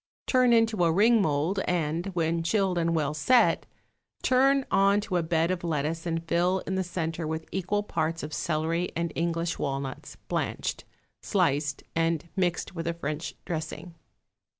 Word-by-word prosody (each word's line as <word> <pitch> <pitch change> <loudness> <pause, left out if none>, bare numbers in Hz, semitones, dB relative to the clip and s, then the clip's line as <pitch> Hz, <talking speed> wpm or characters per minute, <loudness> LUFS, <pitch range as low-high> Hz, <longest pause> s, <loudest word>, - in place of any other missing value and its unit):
Turn 255 -2 +4
into 225 -5 +3
a 165 - +4
ring 220 +6 +5
mould, 160 +3 +1
and, 170 0 -1
when 165 0 +1
chilled 185 0 +1
and 170 0 +1
well 150 -2 0
set, 240 - +3 0.6
turn 270 +1 +4
on 200 +1 +4
to 200 -4 -1
a - - +2
bed 165 +1 +1
of 180 -2 -3
lettuce 160 +1 -2
and 165 0 -2
fill 180 +3 +2
in 190 - -3
the 190 0 0
centre 165 -2 -3
with 160 0 -3
equal 195 +2 -1
parts 165 -4 -2
of 150 +1 -6
celery 165 +3 -1
and 170 -1 -1
English 170 0 -1
walnuts, 135 -1 -4
blanched, - - -2 0.4
sliced 145 0 0
and 165 0 0
mixed 180 -1 -1
with 165 -1 -4
a 170 - -1
French 155 0 -4
dressing. 165 +1 -5
170 Hz, 160 wpm, -27 LUFS, 160-190 Hz, 0.6 s, ring